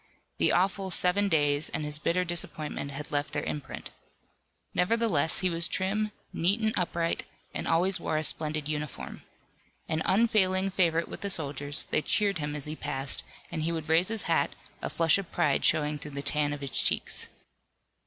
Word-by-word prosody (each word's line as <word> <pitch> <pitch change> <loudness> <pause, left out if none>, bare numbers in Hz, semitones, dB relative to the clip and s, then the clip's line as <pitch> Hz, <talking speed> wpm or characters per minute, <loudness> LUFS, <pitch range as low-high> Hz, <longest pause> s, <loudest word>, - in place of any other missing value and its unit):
The - - +4
awful 190 +2 +1
Seven 190 +3 +2
Days 145 -3 +2
and 155 - -3
his 150 0 -3
bitter 180 +4 +1
disappointment 160 -4 -1
had 140 +1 -7
left 145 0 -1
their - - -1
imprint. 145 -3 -5 0.8
Nevertheless 180 -6 +2
he 185 - +2
was 165 0 +3
trim, 210 +3 0 0.2
neat 190 +6 +2
and 220 0 +1
upright, 170 -2 -1 0.3
and - - -4
always 185 +3 +3
wore 155 - -1
a 155 - 0
splendid 155 -1 +1
uniform. 150 -1 -5 0.7
An 160 -1 -1
unfailing 195 -3 +3
favorite 170 -3 +2
with - - -8
the 200 - -1
soldiers, 145 -3 +1
they - - 0
cheered 200 +1 +1
him 145 0 -3
as 145 - 0
he 150 +1 -4
passed, 135 -3 0 0.3
and 165 -2 -3
he 165 +2 0
would 160 -2 -4
raise 165 +3 +4
his 225 -1 -1
hat, - - +1 0.3
a - - -3
flush 165 +2 +3
of 195 - -7
pride 140 -2 +1
showing 150 -1 +2
through 145 -1 -8
the 140 - -3
tan 145 +1 +1
of 145 -1 -5
his 140 -1 -5
cheeks. - - -1
165 Hz, 180 wpm, -29 LUFS, 150-185 Hz, 0.8 s, The